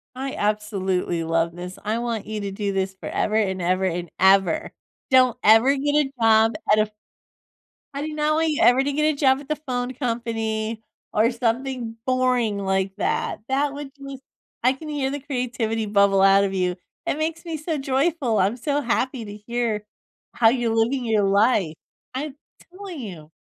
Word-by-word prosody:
I 265 Hz, +1 st, -4 dB
absolutely 195 Hz, -5 st, -1 dB
love 165 Hz, +1 st, 0 dB
this; 180 Hz, +1 st, -7 dB
I 215 Hz, +2 st, -1 dB
want 235 Hz, -3 st, -3 dB
you 215 Hz, -1 st, -4 dB
to 200 Hz, -1 st, -4 dB
do 200 Hz, 0 st, -2 dB
this 190 Hz, 0 st, -1 dB
forever 210 Hz, +2 st, -2 dB
and 190 Hz, -4 st, +1 dB
ever 185 Hz, +2 st, +1 dB
and 175 Hz, -2 st, -2 dB
ever. 190 Hz, -3 st, +3 dB, 0.4 s
Don't 255 Hz, -2 st, +5 dB
ever 225 Hz, +6 st, +6 dB
get 290 Hz, +1 st, 0 dB
a 270 Hz, -, -8 dB
job 225 Hz, 0 st, +5 dB, 0.2 s
at 215 Hz, -, +5 dB
a 215 Hz, 0 st, +1 dB, 1.1 s
you 305 Hz, 0 st, 0 dB
ever 255 Hz, -3 st, +5 dB
to 285 Hz, -, -1 dB
get 305 Hz, +2 st, +2 dB
a -, -, -8 dB
job 270 Hz, -2 st, +3 dB
at 280 Hz, -, -12 dB
the 305 Hz, -, 0 dB
phone 255 Hz, -4 st, -3 dB
company 225 Hz, -3 st, -3 dB, 0.3 s
or 225 Hz, +4 st, +3 dB
something 240 Hz, 0 st, -2 dB
boring 255 Hz, -4 st, +1 dB
like 190 Hz, -1 st, -1 dB
that 455 Hz, -, -1 dB
that 280 Hz, +1 st, 0 dB
would 285 Hz, -1 st, -7 dB
just 275 Hz, -1 st, -9 dB, 0.4 s
I 255 Hz, -, +5 dB
can 305 Hz, +3 st, -9 dB
hear 280 Hz, -3 st, -1 dB
the 285 Hz, +1 st, -4 dB
creativity 245 Hz, -5 st, -2 dB
bubble 200 Hz, -1 st, +3 dB
out 195 Hz, 0 st, +6 dB
of 195 Hz, -1 st, -1 dB
you, 180 Hz, -1 st, 0 dB, 0.3 s
it -, -, -1 dB
makes 325 Hz, +2 st, -3 dB
me 330 Hz, -1 st, -4 dB
so 310 Hz, 0 st, -3 dB
joyful, 270 Hz, -3 st, 0 dB
I'm 195 Hz, +5 st, +1 dB
so 285 Hz, +4 st, -1 dB
happy 250 Hz, 0 st, -1 dB
to 205 Hz, 0 st, -8 dB
hear 235 Hz, -3 st, -1 dB, 0.5 s
how 230 Hz, -2 st, +5 dB
you're 235 Hz, -2 st, 0 dB
living 240 Hz, +3 st, +1 dB
your 215 Hz, -2 st, +2 dB
life. 200 Hz, -4 st, +2 dB, 0.4 s
I'm 275 Hz, +1 st, -4 dB, 0.4 s
telling 375 Hz, -4 st, -8 dB
you! 170 Hz, -10 st, -8 dB
230 Hz, 170 wpm, -23 LUFS, 200-270 Hz, 1.1 s, ever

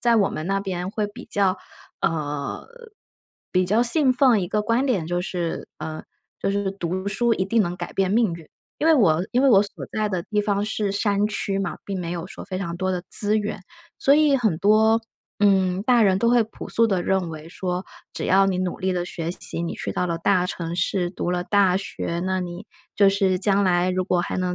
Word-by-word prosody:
在 235 Hz, -1 st, +3 dB
我 200 Hz, -3 st, +3 dB
们 155 Hz, -, -5 dB
那 195 Hz, 0 st, +1 dB
边 185 Hz, -2 st, -4 dB
会 210 Hz, -1 st, -2 dB
比 205 Hz, -, -11 dB
较 195 Hz, -2 st, +1 dB, 0.4 s
呃， 145 Hz, -3 st, -3 dB, 0.8 s
比 185 Hz, 0 st, +2 dB
较 215 Hz, +5 st, +3 dB
信 260 Hz, +2 st, +5 dB
奉 250 Hz, -5 st, +4 dB
一 180 Hz, -, -2 dB
个 210 Hz, +3 st, -1 dB
观 235 Hz, +5 st, +1 dB
点 215 Hz, -, 0 dB
就 175 Hz, +2 st, -2 dB
是 175 Hz, -2 st, -3 dB
呃， 155 Hz, 0 st, -6 dB, 0.4 s
就 195 Hz, -, 0 dB
是 200 Hz, -1 st, -1 dB
读 185 Hz, 0 st, -3 dB
书 235 Hz, +3 st, +1 dB
一 185 Hz, -, -1 dB
定 225 Hz, +3 st, +1 dB
能 175 Hz, -2 st, -1 dB
改 175 Hz, -1 st, -6 dB
变 190 Hz, -1 st, +1 dB
命 220 Hz, -4 st, +2 dB
运， 165 Hz, -2 st, -10 dB, 0.3 s
因 315 Hz, -, 0 dB
为 325 Hz, -, +6 dB
我 180 Hz, -, +3 dB
因 250 Hz, +2 st, +2 dB
为 275 Hz, -, +5 dB
我 200 Hz, -6 st, +6 dB
所 205 Hz, -, -5 dB
在 215 Hz, -1 st, 0 dB
的 185 Hz, -3 st, -2 dB
地 210 Hz, +2 st, -1 dB
方 205 Hz, -1 st, 0 dB
是 210 Hz, -2 st, -2 dB
山 205 Hz, 0 st, +1 dB
区 195 Hz, -2 st, -2 dB
嘛， 195 Hz, -3 st, -3 dB
并 195 Hz, -1 st, -4 dB
没 170 Hz, -1 st, -4 dB
有 170 Hz, -1 st, -4 dB
说 -, -, -9 dB
非 185 Hz, -1 st, -5 dB
常 170 Hz, -2 st, -4 dB
多 185 Hz, +1 st, -1 dB
的 180 Hz, -1 st, -3 dB
资 210 Hz, +1 st, +3 dB
源， 210 Hz, -2 st, -3 dB, 0.4 s
所 280 Hz, -, +4 dB
以 300 Hz, -2 st, +4 dB
很 220 Hz, -10 st, +1 dB
多， 220 Hz, +3 st, +4 dB, 0.4 s
嗯， 190 Hz, -2 st, +3 dB
大 240 Hz, +1 st, +3 dB
人 190 Hz, -2 st, +4 dB
都 235 Hz, +2 st, +3 dB
会 240 Hz, -2 st, +4 dB
朴 220 Hz, -, -10 dB
素 230 Hz, 0 st, +3 dB
地 190 Hz, -4 st, 0 dB
认 190 Hz, -3 st, 0 dB
为 155 Hz, 0 st, -9 dB
说， 180 Hz, +1 st, -4 dB, 0.3 s
只 -, -, -4 dB
要 195 Hz, +1 st, +4 dB
你 185 Hz, -2 st, 0 dB
努 185 Hz, -1 st, -2 dB
力 190 Hz, 0 st, -1 dB
了 175 Hz, -1 st, -2 dB
学 170 Hz, -1 st, -4 dB
习， 175 Hz, -, +1 dB
你 170 Hz, -, -3 dB
去 -, -, -5 dB
到 180 Hz, -, -1 dB
了 170 Hz, -1 st, -2 dB
大 180 Hz, +1 st, +2 dB
城 170 Hz, -2 st, -4 dB
市， 175 Hz, 0 st, 0 dB
读 175 Hz, -1 st, -3 dB
了 175 Hz, 0 st, -1 dB
大 195 Hz, -3 st, +3 dB
学， 170 Hz, -3 st, -3 dB
那 185 Hz, 0 st, 0 dB
你 180 Hz, +3 st, -7 dB, 0.3 s
就 200 Hz, -2 st, +6 dB
是 195 Hz, -1 st, +2 dB
将 200 Hz, 0 st, +2 dB
来 180 Hz, 0 st, +2 dB
如 185 Hz, 0 st, -1 dB
果 180 Hz, -1 st, +1 dB
还 175 Hz, -, -3 dB
能 180 Hz, -1 st, -1 dB
195 Hz, 245 characters per minute, -23 LUFS, 180-210 Hz, 0.8 s, 为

